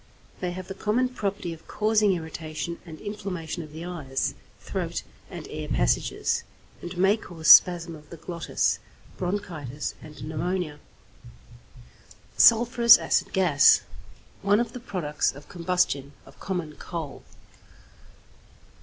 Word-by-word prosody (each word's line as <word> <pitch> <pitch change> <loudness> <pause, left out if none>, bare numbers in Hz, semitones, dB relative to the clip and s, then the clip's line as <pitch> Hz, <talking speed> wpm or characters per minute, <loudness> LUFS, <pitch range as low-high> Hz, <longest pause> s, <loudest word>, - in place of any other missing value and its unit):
They 180 - -2
have 185 0 -7
the 195 - -5
common 220 +6 0
property 200 -7 -3
of 165 - -15
causing 215 -2 +2
irritation 160 0 -5
and 155 -1 -9
inflammation 185 -6 -5
of 155 -2 -10
the 160 +3 -7
eyes, 145 -7 -2 0.3
throat, - - -4 0.3
and - - -8
air - - -6
passages, - - 0 0.4
and 175 +1 -7
may 190 +3 +4
cause 165 -6 -3
spasm 170 -2 +7
of 150 -1 -15
the 170 - -9
glottis, 170 +1 -1 0.4
bronchitis, 170 -8 -4
and 155 -2 -11
pneumonia. 160 -1 -2 1.6
=Sulphurous 235 0 +7
Acid - - 0
Gas.= 175 -7 +5 0.6
One 205 +2 +3
of 235 -1 -2
the 250 - -6
products 175 - -1
of 145 +2 -13
combustion 170 -6 -1
of 135 - -17
common 175 -6 -4
coal. 165 -5 -6
175 Hz, 125 wpm, -26 LUFS, 155-200 Hz, 1.6 s, spasm